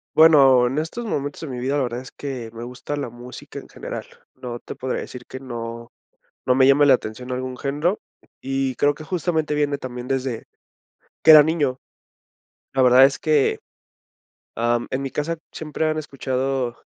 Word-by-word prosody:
Bueno, 135 -6 +7
en 130 +4 -3
estos 165 +10 -3
momentos 145 -10 -3
de 160 - -5
mi 125 -3 -5
vida, 135 +3 -1
la 145 - +1
verdad 120 -1 -3
es 130 - -10
que 130 -5 -6
me 115 +1 -7
gusta 125 +4 -6
la 145 -4 -4
música 120 +2 -10
en - - -13
general. - - -7 0.3
No 120 -1 -7
te - - -8
podría 130 0 -3
decir 125 -1 -9
que 130 - -9
no 115 -2 -7 0.5
no 130 - +4
me 130 +1 +5
llame 140 +2 +6
la 140 - +7
atención 125 +1 -3
algún 130 0 -4
género, 150 +9 -1 0.4
y 135 -1 -2
creo 145 +4 +3
que 155 - -11
justamente 160 -3 -1
viene 145 -1 0
también 125 -1 -7
desde 130 -3 -2 0.8
que 160 - +9
era 155 -1 +11
niño. 145 -4 0 1.0
La 135 - +3
verdad 125 +1 +7
es 135 +1 +2
que, 150 -3 +2 1.0
ah, 120 +1 +1
mm, - - -7
en 130 +1 -2
mi 135 - -4
casa 165 +3 -2 0.2
siempre 155 0 -3
han 155 0 0
escuchado 135 -3 -2
135 Hz, 185 wpm, -22 LUFS, 125-145 Hz, 1.0 s, era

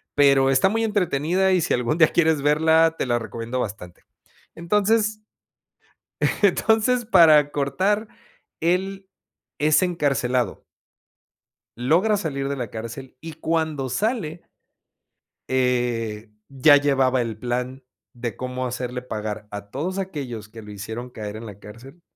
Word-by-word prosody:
pero 140 -2 +5
está 135 +8 +4
muy 225 +2 0
entretenida 185 -2 +1
y, 185 - +3
si - - 0
algún 125 +6 0
día 160 -2 +6
quieres 160 -3 +2
verla 160 +2 +3
te - - -1
la 120 -1 +1
recomiendo 115 +3 -5
bastante. 100 -6 -6 0.5
Entonces 210 +4 +1 1.2
entonces 220 +4 +2
para 155 -8 +6
cortar 195 +10 0 0.5
él 190 +3 -1 0.5
es 155 +4 +4
encarcelado. 130 - 0 1.1
Logra 170 - +2
salir 140 -8 -3
de 140 - -2
la 120 -5 -5
cárcel 115 +4 -8
y 165 -1 -8
cuando 155 -4 -2
sale. 175 - -2 1.0
Eh, 120 -4 -1 0.2
ya 145 +2 +6
llevaba 135 -3 +2
el 115 -2 -4
plan 125 +2 -4 0.3
de 120 -3 -5
cómo 130 0 -4
hacerle 125 0 -4
pagar 110 -3 -5
a 100 0 -8
todos 180 - -3
aquellos 130 - -5
que 115 0 -11
lo 105 0 -11
hicieron 110 +5 -7
caer 105 -3 -7
en 115 +1 -8
la 100 -2 -10
cárcel, 130 +11 -13
135 Hz, 130 wpm, -23 LUFS, 120-170 Hz, 1.2 s, día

